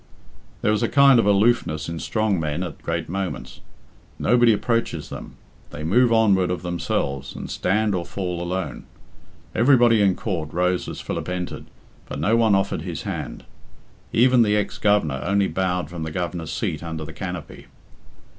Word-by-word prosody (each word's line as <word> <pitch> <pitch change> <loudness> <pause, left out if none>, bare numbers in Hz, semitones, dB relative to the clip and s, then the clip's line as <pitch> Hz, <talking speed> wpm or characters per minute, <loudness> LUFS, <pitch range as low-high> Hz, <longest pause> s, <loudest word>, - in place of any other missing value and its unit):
There 105 - +3
is 105 - +1
a - - +1
kind 140 -1 +6
of 115 - +2
aloofness 100 -7 +2
in 85 0 -4
strong 100 +4 0
men 75 +2 -2
at 85 -6 -7
great 80 0 -3
moments. 95 +1 -5 0.6
Nobody 120 0 +4
approaches 110 -8 -1
them. - - -8 0.3
They 75 - -7
move 120 +9 +3
onward 100 -5 +4
of 90 -1 -3
themselves, 70 -5 -2
and - - -6
stand 105 +3 +1
or 90 -2 -1
fall 90 -2 -4
alone. 90 +2 -4 0.7
Everybody 120 -3 +5
in 95 -3 +3
court 85 -8 -3
rose 90 +1 0
as - - -6
Philip - - -4
entered, 90 -1 -4 0.4
but - - -6
no 110 - +2
one 110 -3 +4
offered 95 0 0
his - - -5
hand. - - -5 0.7
Even 125 +1 +5
the 105 -2 +3
ex 105 - -2
Governor 80 -11 +2
only 100 +1 +2
bowed 90 -3 -1
from 85 +1 -7
the 80 - -3
Governor's 85 -2 -4
seat 75 - -2
under 80 -2 -5
the - - -9
canopy. 90 -5 -7
95 Hz, 165 wpm, -23 LUFS, 85-110 Hz, 0.7 s, kind